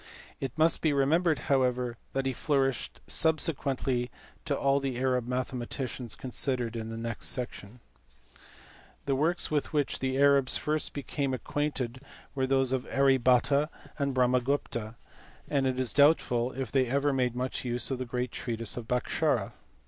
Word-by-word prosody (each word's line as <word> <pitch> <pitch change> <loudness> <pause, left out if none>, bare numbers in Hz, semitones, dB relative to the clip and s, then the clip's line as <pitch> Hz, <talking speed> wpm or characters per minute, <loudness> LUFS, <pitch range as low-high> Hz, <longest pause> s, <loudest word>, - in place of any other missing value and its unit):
It 135 +2 -5
must 160 +1 +3
be 155 -2 +2
remembered 155 +4 +3
however 125 -3 +1 0.2
that 135 0 -1
he 135 - 0
flourished 135 -1 0
subsequently 135 -5 0 0.4
to 145 -4 0
all 140 0 +3
the 135 -3 -3
Arab 125 -2 +1
mathematicians 125 -1 -3
considered 125 -2 -2
in 110 -1 -4
the 115 - -5
next 115 -1 -3
section. 120 -2 -5 0.5
miASKARA. - - -23
1G1 - - -24 0.6
The 140 - +1
works 160 +6 +1
with 150 +1 -1
which 145 -2 0
the 130 0 -1
Arabs 140 -2 +5
first 155 0 -1
became 140 -1 -2
acquainted 130 -3 -3 0.3
were 130 -1 0
those 135 -1 +2
of 130 -1 -2
Arya 135 -1 +4
Bhata 130 +4 +3 0.3
and 140 -2 0
Brahmagupta, 125 -3 +1 0.5
and 135 -2 +1
it 130 -1 -1
is 130 -3 -1
doubtful 130 -4 +4
if 130 -4 -4
they 130 -2 +2
ever 140 +3 +1
made 125 -2 0
much 125 +1 -3
use 125 +1 -2
of 130 - -2
the 130 - -2
great 125 0 -2
treatise 115 -2 -3
of 115 -2 -6
Bhaskara. 125 +1 0
130 Hz, 160 wpm, -29 LUFS, 125-140 Hz, 0.6 s, Arabs